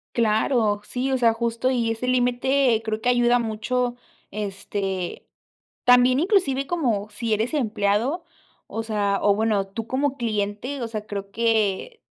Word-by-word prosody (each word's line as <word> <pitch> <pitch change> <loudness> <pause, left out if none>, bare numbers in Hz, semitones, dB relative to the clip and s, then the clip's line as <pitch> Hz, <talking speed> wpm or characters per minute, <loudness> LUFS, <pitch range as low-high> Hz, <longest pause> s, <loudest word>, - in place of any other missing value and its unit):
Claro, 220 -1 +2
sí, 250 +5 -3
o 265 - +2
sea, 235 -2 +4
justo. 235 +2 -1
Y 235 -3 +1
ese 225 +2 -3
límite 250 -1 +2
creo 220 -1 -2
que 245 - -3
ayuda 245 0 +4
mucho, 240 +2 -1 0.3
este, 195 -2 -4 0.6
también 250 +1 +6
inclusive 305 -7 +1
como 235 -12 -1
si 230 -1 -2
eres 220 +5 -1
empleado, 230 - 0 0.4
o 225 +2 -4
sea 205 -3 0
o 205 -1 +4
bueno, 210 -2 +1
tú 220 +3 -6
como 275 +1 -1
cliente, 220 +3 -2
o 235 - -2
sea, 215 -2 -5
creo 200 -1 -5
que 225 - 0
230 Hz, 150 wpm, -24 LUFS, 210-255 Hz, 0.6 s, también